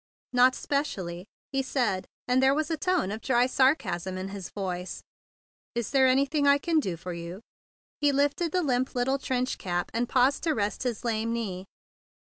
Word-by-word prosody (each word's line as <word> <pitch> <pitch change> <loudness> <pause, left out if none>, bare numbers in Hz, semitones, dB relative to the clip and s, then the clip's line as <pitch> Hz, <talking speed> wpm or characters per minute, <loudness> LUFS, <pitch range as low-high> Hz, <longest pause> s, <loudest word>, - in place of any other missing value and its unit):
"Not 250 +1 +5
specially," 190 - -3 0.2
he 270 -1 +1
said; 245 -8 -1 0.2
and 250 +1 +3
there 265 +1 +4
was 310 +1 -1
a - - +2
tone 350 - 0
of 220 +2 -5
dry 245 0 +3
sarcasm 255 - +1
in 190 +1 -4
his 195 -2 -7
voice. 185 -2 -4 0.7
"Is 235 -3 -2
there 265 -2 +5
anything 280 +3 +2
I 280 0 +6
can 325 +2 +1
do 185 - -2
for 180 +2 -6
you?" 170 +2 -7 0.6
ITe 290 -1 +3
lifted 290 +4 +1
the 365 +1 +1
limp 260 -2 0
little 265 +3 +1
trench 255 -1 -1
cap, 175 -1 -2
and 235 +1 -1
paused 260 +2 +3
to 325 -2 +1
rest 205 -2 -1
his 245 -2 -3
lame 225 0 0
knee. 195 -6 -3
250 Hz, 180 wpm, -28 LUFS, 195-280 Hz, 0.7 s, I